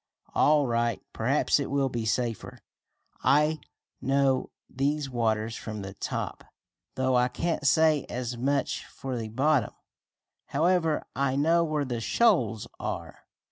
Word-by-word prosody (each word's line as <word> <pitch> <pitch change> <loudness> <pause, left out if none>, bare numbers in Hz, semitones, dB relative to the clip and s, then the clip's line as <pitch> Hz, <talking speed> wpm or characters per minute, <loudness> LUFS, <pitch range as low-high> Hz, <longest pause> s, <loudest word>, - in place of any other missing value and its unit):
"All 150 -1 +4
right. 115 -2 0
Perhaps - - +2
it - - -3
will 140 -1 +1
be 120 -3 -3
safer. 115 -1 -2 0.7
I 150 +2 +3 0.4
know 135 -1 +2 0.2
these 140 +1 -1
waters 110 -2 0
from 105 -2 -6
the 95 0 -7
top, - - -4 0.5
though 130 0 +1
I 125 0 +4
can't 145 +3 -1
say 155 0 +4
as 125 0 -3
much 140 +4 -1
for 135 -2 -6
the 115 -2 -4
bottom. 130 0 +1 0.7
However, 165 +1 +1
I 135 -1 +1
know 165 +4 +3
where 155 -3 -1
the 120 -3 -3
shoals 120 - +2
are." - - -6
135 Hz, 135 wpm, -27 LUFS, 120-150 Hz, 0.7 s, All